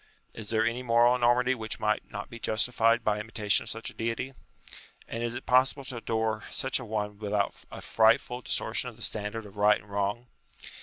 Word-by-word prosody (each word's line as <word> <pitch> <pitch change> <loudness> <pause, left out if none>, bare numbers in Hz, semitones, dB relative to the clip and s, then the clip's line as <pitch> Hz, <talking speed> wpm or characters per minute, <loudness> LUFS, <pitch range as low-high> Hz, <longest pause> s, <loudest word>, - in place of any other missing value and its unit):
Is 110 -2 -7
there 110 0 +2
any 120 +2 -1
moral 120 0 +4
enormity 125 +1 +3
which 110 -3 -4
might 105 0 0
not 105 -1 -6
be 115 - -10
justified 115 +1 +2
by 105 -1 +1
imitation 105 -1 +1
of - - -7
such 115 +1 -5
a - - -17
Deity? 115 +4 -3 0.7
And 115 - -5
is 120 0 -2
it - - -6
possible 130 +2 +3
to 125 -1 -6
adore 110 -1 -1
such 130 0 0
a 125 - -7
one 105 -2 -3
without 105 -1 -1
a - - -8
frightful 115 +2 +3
distortion - - -1
of - - -14
the - - -8
standard 110 +1 -3
of 100 0 -13
right 105 +1 +4
and 100 - -18
wrong? 100 +4 -2
115 Hz, 200 wpm, -28 LUFS, 105-120 Hz, 0.7 s, moral